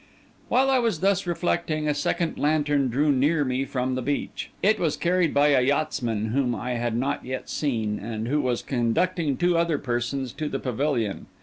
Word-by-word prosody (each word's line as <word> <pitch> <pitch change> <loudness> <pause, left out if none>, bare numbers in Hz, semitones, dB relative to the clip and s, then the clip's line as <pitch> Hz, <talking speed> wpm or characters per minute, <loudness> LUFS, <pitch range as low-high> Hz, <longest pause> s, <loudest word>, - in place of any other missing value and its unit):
While 265 +2 +3
I 260 - +4
was 225 -9 0
thus 195 -1 +2
reflecting, 170 -3 -1
a 150 - +2
second 165 +3 -1
lantern 145 -2 +2
drew 145 +5 +2
near 145 +3 +2
me 130 +1 -1
from 130 -1 -2
the 130 - -2
beach. 145 +3 -3
It 215 +2 +4
was 160 -4 0
carried 175 -2 +2
by 145 +1 +4
a 135 -3 +4
yachtsman 125 -6 0
whom 125 0 +1
I 125 +3 -4
had 120 -1 -1
not 140 +4 -1
yet 130 0 -5
seen, 110 -8 -1
and 110 +1 -4
who 145 +4 +1
was 125 -3 -1
conducting 140 - 0
two 175 0 +2
other 170 -3 +1
persons 125 0 -2
to 155 -1 -3
the - - -2
pavilion. 125 -5 -2
140 Hz, 190 wpm, -25 LUFS, 125-160 Hz, -, I